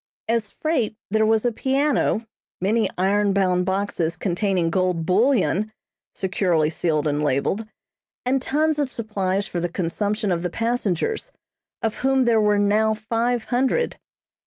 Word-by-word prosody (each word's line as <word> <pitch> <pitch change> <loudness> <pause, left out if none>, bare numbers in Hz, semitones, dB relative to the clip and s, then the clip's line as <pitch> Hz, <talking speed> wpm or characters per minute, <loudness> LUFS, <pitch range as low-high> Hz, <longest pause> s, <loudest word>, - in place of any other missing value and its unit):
As 225 -2 0
freight, 280 -9 -1 0.2
there 220 0 +3
was 220 +1 +2
a 240 - +3
piano, 265 -2 +1 0.3
many 215 +4 +1
iron 200 +2 +2
bound 180 -2 +1
boxes 190 -4 -1
containing 180 -2 0
gold 180 -3 0
bullion, 215 - +2 0.4
securely 180 -5 +1
sealed 155 -3 0
and 150 0 0
labeled, 150 +10 0 0.6
and 260 +1 +1
tons 305 +3 +1
of 280 -3 0
supplies 200 -4 -1
for 175 - -4
the 175 +1 -1
consumption 205 +4 -1
of 170 -1 0
the 180 - -2
passengers, 230 - -1 0.5
of 220 -1 -1
whom 265 -1 +2
there 230 -2 +4
were 210 -1 +3
now 215 +2 +2
five 230 +2 -1
hundred. 265 - +1
210 Hz, 140 wpm, -23 LUFS, 185-235 Hz, 0.6 s, there